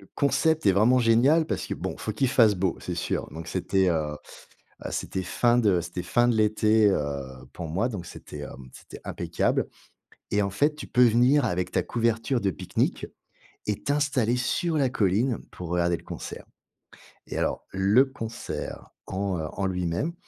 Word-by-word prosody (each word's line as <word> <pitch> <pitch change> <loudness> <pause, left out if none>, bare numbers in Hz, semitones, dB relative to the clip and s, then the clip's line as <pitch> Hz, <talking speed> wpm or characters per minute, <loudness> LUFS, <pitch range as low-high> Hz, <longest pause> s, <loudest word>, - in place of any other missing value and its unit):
le - - -18
concept 145 0 +2
est 95 - +6
vraiment 115 +6 +4
génial 130 +8 +4
parce - - -3
que, - - -3
bon, - - -4
il - - -14
faut 110 - -3
qu'il 130 +4 +1
fasse 115 -5 +5
beau, 90 -1 0
c'est 90 - -4
sûr. 85 - -2
Donc 80 0 -7
c'était, 95 -1 +1
heu, 75 -2 -1 0.7
heu, - - -2
c'était 95 - -3
fin 120 +6 +2
de 100 -7 +3
c'était 90 +1 -5
fin 120 +6 +2
de 120 - +2
l'été, 110 0 +4
heu, 70 -6 -1 0.3
pour 85 -2 -6
moi, 95 +10 0
donc 100 -7 -6
c'était - - -10
hem, 65 0 -9
c'était - - -12
impeccable. - - -1 0.6
Et 105 0 +2
en 100 - -1
fait, 145 +10 +1
tu - - -7
peux 125 +1 +4
venir 125 +5 +4
avec 90 -5 -1
ta - - +2
couverture 115 +2 0
de 100 - +1
pique-nique 85 - -2 0.6
et 105 - -2
t'installer 140 -5 +1
sur 160 +5 0
la 135 -3 +2
colline 115 +2 +1
pour 90 -2 -8
regarder 85 0 +1
le - - -16
concert. - - -7 0.8
Et - - -6
alors, - - -1
le 100 +7 +4
concert 115 -4 -6 0.2
en, 95 -2 -2
heu, 80 - -3
en 100 - -2
lui-même, 90 - -1
110 Hz, 185 wpm, -26 LUFS, 90-125 Hz, 0.8 s, est